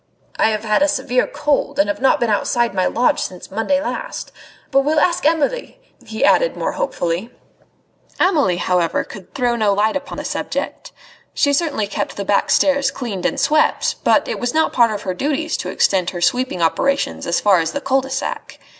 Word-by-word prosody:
"I -, -, +3 dB
have 215 Hz, -1 st, -2 dB
had 215 Hz, +1 st, +1 dB
a 295 Hz, -, +5 dB
severe 250 Hz, -3 st, 0 dB
cold, 290 Hz, -1 st, -1 dB
and 295 Hz, -, +3 dB
have 310 Hz, -, -3 dB
not 265 Hz, -, +3 dB
been 235 Hz, -2 st, +1 dB
outside 235 Hz, +2 st, +1 dB
my 185 Hz, -1 st, +1 dB
lodge 250 Hz, +5 st, +1 dB
since 180 Hz, 0 st, -6 dB
Monday 225 Hz, +8 st, 0 dB
last. -, -, -5 dB, 0.4 s
But 275 Hz, -, +4 dB
we'll 300 Hz, +3 st, +2 dB
ask 345 Hz, +3 st, +1 dB
Amelie!" 330 Hz, +11 st, -1 dB, 0.3 s
he -, -, -1 dB
added -, -, +3 dB
more -, -, -1 dB
hopefully. 185 Hz, -, -2 dB, 0.9 s
Amelie, 295 Hz, -, +2 dB
however, 175 Hz, -2 st, 0 dB
could 190 Hz, -4 st, -13 dB
throw 245 Hz, -2 st, +1 dB
no 215 Hz, -3 st, +2 dB
light 215 Hz, +4 st, +1 dB
upon 280 Hz, 0 st, -5 dB
the -, -, -5 dB
subject. -, -, -4 dB, 0.4 s
She 285 Hz, -2 st, +2 dB
certainly 285 Hz, -8 st, 0 dB
kept 200 Hz, -, -4 dB
the 200 Hz, -, -3 dB
back 200 Hz, +1 st, +1 dB
stairs 280 Hz, -1 st, +3 dB
cleaned 225 Hz, -10 st, -3 dB
and -, -, -3 dB
swept, 305 Hz, +2 st, +1 dB
but -, -, +3 dB
it -, -, -3 dB
was 245 Hz, +2 st, -2 dB
not 320 Hz, -, +2 dB
part 235 Hz, -2 st, +4 dB
of 210 Hz, -2 st, -4 dB
her 185 Hz, -, -2 dB
duties 300 Hz, -, -1 dB
to -, -, -5 dB
extend 185 Hz, -2 st, +1 dB
her 175 Hz, -, -6 dB
sweeping 245 Hz, -4 st, 0 dB
operations 275 Hz, +12 st, 0 dB
as 170 Hz, -, +1 dB
far 200 Hz, -4 st, +4 dB
as 160 Hz, -, -1 dB
the 285 Hz, -, -3 dB
cul 270 Hz, -1 st, +1 dB
de 265 Hz, -, -9 dB
sac. 270 Hz, 0 st, -5 dB
250 Hz, 200 wpm, -19 LUFS, 200-290 Hz, 0.9 s, a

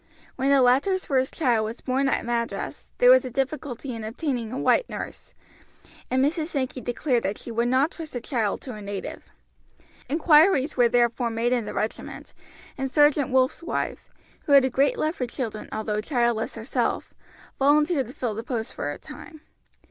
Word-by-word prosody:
When 265 Hz, +1 st, 0 dB
the 275 Hz, -2 st, +5 dB
latter's 280 Hz, +10 st, +2 dB
first 260 Hz, -2 st, +1 dB
child 245 Hz, -8 st, +1 dB
was 220 Hz, +2 st, -5 dB
born 270 Hz, +1 st, 0 dB
at -, -, 0 dB
Madras 235 Hz, -1 st, -3 dB
there -, -, +7 dB
was -, -, +6 dB
a -, -, -5 dB
difficulty 270 Hz, 0 st, -3 dB
in 225 Hz, -1 st, -6 dB
obtaining 235 Hz, 0 st, -3 dB
a 255 Hz, -, -4 dB
white -, -, +2 dB
nurse, -, -, -8 dB, 0.7 s
and 260 Hz, +1 st, +2 dB
Mrs. 315 Hz, +1 st, -1 dB
Sankey 265 Hz, -5 st, -3 dB
declared 245 Hz, 0 st, 0 dB
that 195 Hz, 0 st, -2 dB
she 235 Hz, -, -8 dB
would 235 Hz, +1 st, 0 dB
not 265 Hz, +6 st, +2 dB
trust 320 Hz, -3 st, -9 dB
the 245 Hz, -, -2 dB
child 230 Hz, -4 st, -1 dB
to 255 Hz, -, -7 dB
a 210 Hz, -, -8 dB
native. 200 Hz, -1 st, -6 dB, 0.8 s
Inquiries 305 Hz, 0 st, +4 dB
were 245 Hz, -2 st, +4 dB
therefore 240 Hz, 0 st, +2 dB
made 230 Hz, +2 st, 0 dB
in 240 Hz, -3 st, 0 dB
the -, -, -6 dB
regiment, 215 Hz, -, -4 dB, 0.5 s
and 270 Hz, 0 st, -1 dB
Sergeant 295 Hz, -2 st, +4 dB
Wolf's 260 Hz, +4 st, +2 dB
wife, 335 Hz, -, -4 dB, 0.4 s
who 285 Hz, -, +3 dB
had 275 Hz, -2 st, +7 dB
a 260 Hz, -, -1 dB
great 275 Hz, +3 st, +2 dB
love 310 Hz, +1 st, 0 dB
for 250 Hz, -, -2 dB
children 230 Hz, -4 st, -5 dB
although 215 Hz, -1 st, -2 dB
childless 235 Hz, -2 st, 0 dB
herself, 225 Hz, +3 st, -2 dB, 0.5 s
volunteered 295 Hz, 0 st, +3 dB
to 250 Hz, -, -10 dB
fill 245 Hz, -5 st, -3 dB
the 220 Hz, -, -4 dB
post 230 Hz, -2 st, -4 dB
for -, -, -3 dB
a -, -, -6 dB
time. 310 Hz, -2 st, -12 dB
255 Hz, 185 wpm, -25 LUFS, 235-285 Hz, 0.8 s, there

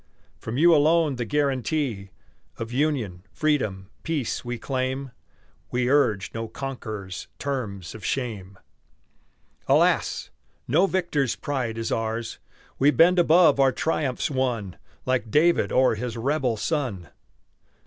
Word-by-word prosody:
From 115 Hz, +2 st, -5 dB
you 170 Hz, +3 st, +6 dB
alone 155 Hz, -2 st, +3 dB
the 120 Hz, -, -2 dB
guaranty 135 Hz, -5 st, -1 dB, 0.5 s
Of 115 Hz, 0 st, -5 dB
union, 125 Hz, -, -1 dB
freedom, 105 Hz, -11 st, -1 dB
peace, 155 Hz, -8 st, -2 dB
we 120 Hz, 0 st, -4 dB
claim; 130 Hz, +2 st, -3 dB, 0.6 s
We 125 Hz, +1 st, 0 dB
urge 110 Hz, -10 st, +2 dB
no 115 Hz, 0 st, -4 dB
conqueror's 110 Hz, -7 st, -6 dB
terms 110 Hz, -10 st, -4 dB
of 110 Hz, -, -10 dB
shame. 105 Hz, -7 st, -3 dB, 1.1 s
Alas! -, -, +2 dB, 0.4 s
no 170 Hz, +10 st, +4 dB
victor's 170 Hz, -9 st, 0 dB
pride 125 Hz, -6 st, -3 dB
is 115 Hz, 0 st, -3 dB
ours; 115 Hz, 0 st, -2 dB, 0.4 s
We 140 Hz, -, +5 dB
bend 175 Hz, +4 st, +5 dB
above 165 Hz, -3 st, +5 dB
our 135 Hz, -1 st, +5 dB
triumphs 145 Hz, -2 st, -1 dB
won 120 Hz, -8 st, -1 dB, 0.3 s
Like 125 Hz, -3 st, 0 dB
David 165 Hz, +8 st, +3 dB
o'er 130 Hz, -2 st, +4 dB
his 115 Hz, +1 st, -4 dB
rebel 130 Hz, -1 st, 0 dB
son. 115 Hz, -, -2 dB
130 Hz, 120 wpm, -25 LUFS, 110-145 Hz, 1.1 s, you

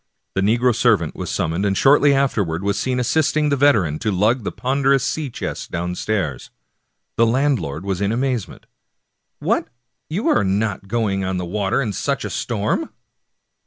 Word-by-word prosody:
The 95 Hz, -, 0 dB
negro 120 Hz, +5 st, +3 dB
servant 110 Hz, -9 st, +2 dB
was -, -, -5 dB
sum 80 Hz, -, -1 dB
moned, 85 Hz, +4 st, -1 dB
and 100 Hz, -1 st, +1 dB
shortly 145 Hz, +1 st, +5 dB
afterwards 100 Hz, -11 st, 0 dB
was 100 Hz, 0 st, 0 dB
seen 130 Hz, -1 st, -1 dB
assisting 150 Hz, +3 st, +1 dB
the 140 Hz, -, +2 dB
veteran 105 Hz, -, +3 dB
to 110 Hz, -, -1 dB
lug 105 Hz, +6 st, +1 dB
the -, -, -3 dB
ponderous 135 Hz, 0 st, +1 dB
sea 150 Hz, +1 st, -2 dB
chest -, -, -5 dB
downstairs. 90 Hz, -, -3 dB, 0.7 s
The 115 Hz, -, +4 dB
landlord 115 Hz, -, 0 dB
was 95 Hz, -1 st, -2 dB
in 100 Hz, +1 st, +1 dB
amazement. 125 Hz, -4 st, -2 dB, 0.4 s
" -, -, -54 dB
What, -, -, +1 dB, 0.4 s
you 185 Hz, +8 st, -2 dB
are 105 Hz, -, +3 dB
not 100 Hz, 0 st, -1 dB
going 100 Hz, -3 st, 0 dB
on 95 Hz, 0 st, -2 dB
the 90 Hz, -, -3 dB
water 100 Hz, +7 st, 0 dB
in 105 Hz, -5 st, -3 dB
such -, -, -2 dB
a -, -, -4 dB
storm -, -, -1 dB
110 Hz, 170 wpm, -21 LUFS, 95-130 Hz, 0.7 s, shortly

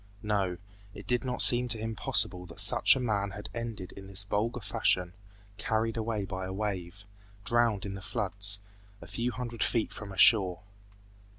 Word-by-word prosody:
No, 100 Hz, -4 st, 0 dB, 0.4 s
it -, -, -10 dB
did 125 Hz, +1 st, 0 dB
not 125 Hz, -1 st, +1 dB
seem 125 Hz, 0 st, +6 dB
to 115 Hz, -, +3 dB
him 110 Hz, 0 st, -4 dB
possible 90 Hz, -3 st, +1 dB
that 85 Hz, -, -11 dB
such -, -, +5 dB
a -, -, -2 dB
man 105 Hz, -5 st, 0 dB
had 105 Hz, -, -6 dB
ended 115 Hz, -6 st, -5 dB
in 95 Hz, 0 st, -11 dB
this 100 Hz, 0 st, -6 dB
vulgar 105 Hz, +4 st, -1 dB
fashion, 90 Hz, -3 st, 0 dB, 0.5 s
carried 110 Hz, 0 st, 0 dB
away 110 Hz, -3 st, -2 dB
by 95 Hz, -1 st, -5 dB
a -, -, -5 dB
wave, 100 Hz, -2 st, -4 dB, 0.4 s
drowned 115 Hz, -4 st, +2 dB
in 100 Hz, -, -4 dB
the 95 Hz, -, -7 dB
floods, 100 Hz, -2 st, +1 dB, 0.4 s
a -, -, -11 dB
few 120 Hz, +1 st, -2 dB
hundred 120 Hz, -1 st, -6 dB
feet 115 Hz, -3 st, 0 dB
from 105 Hz, -2 st, -7 dB
a 95 Hz, -, -9 dB
shore. 95 Hz, -4 st, +5 dB
105 Hz, 180 wpm, -30 LUFS, 95-115 Hz, 0.5 s, seem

